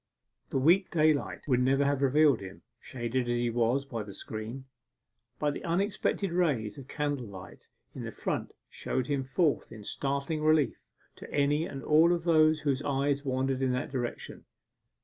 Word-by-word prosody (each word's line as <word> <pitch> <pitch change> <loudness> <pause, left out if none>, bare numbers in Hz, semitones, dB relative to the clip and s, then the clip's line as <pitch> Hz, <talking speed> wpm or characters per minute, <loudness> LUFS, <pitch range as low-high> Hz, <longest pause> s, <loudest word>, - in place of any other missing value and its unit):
The - - -1
weak 175 +8 +4
daylight 155 -3 +1
would 125 -3 +3
never 135 +2 +3
have 140 -1 +1
revealed 140 -1 +4
him, 95 -1 -10 0.2
shaded 120 0 -3
as 120 - +1
he 120 0 0
was 120 +4 +1
by 115 -5 -4
the 100 -1 -8
screen; 110 +5 -6 0.7
but 145 -1 0
the - - -7
unexpected 195 +1 0
rays 140 - 0
of 135 - -11
candle 145 -5 -2
light 95 -2 -12 0.2
in - - -7
the - - -5
front - - -3 0.2
showed 130 - -3
him 140 0 -1
forth 145 +3 0
in 110 -2 -10
startling 140 +6 -2
relief 155 -2 +3 0.4
to - - -11
any 145 +3 +1
and 135 -1 -7
all 160 +3 +5
of 170 -1 -2
those 155 -2 +4
whose 140 -2 0
eyes 140 0 0
wandered 130 0 -1
in 130 -1 +1
that 125 - -3
direction. 125 -3 -5
140 Hz, 170 wpm, -29 LUFS, 125-155 Hz, 0.7 s, all